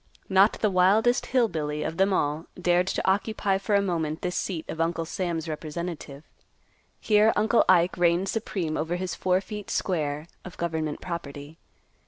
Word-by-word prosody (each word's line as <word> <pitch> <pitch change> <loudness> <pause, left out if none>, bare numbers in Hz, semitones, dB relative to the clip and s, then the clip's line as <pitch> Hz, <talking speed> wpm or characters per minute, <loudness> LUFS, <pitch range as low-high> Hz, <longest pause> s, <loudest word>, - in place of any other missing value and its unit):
Not 195 +2 +5
the 215 - 0
wildest 205 +7 +3
"Hill 250 -2 +3
Billy" 150 -5 -3
of 160 - -4
them 195 +1 +3
all 150 -2 0
dared 180 0 +2
to 195 - -2
occupy 195 0 +1
for 205 +1 0
a 200 - +3
moment 160 -4 -2
this 180 0 -2
seat 170 -5 -3
of 160 - -4
Uncle 165 0 -1
Sam's 170 -1 -3
representative. 155 -2 -6 0.8
Here 215 +1 +4
Uncle 220 +2 +3
Ike 180 -1 +4
reigned 175 +2 +2
supreme 190 -7 -2
over 165 +3 -1
his 180 0 -3
four 185 0 +1
feet 210 0 -8
square 150 -4 -1 0.2
of 180 - -10
government 160 -3 -3
property. 150 -3 -7
175 Hz, 165 wpm, -26 LUFS, 160-195 Hz, 0.8 s, Not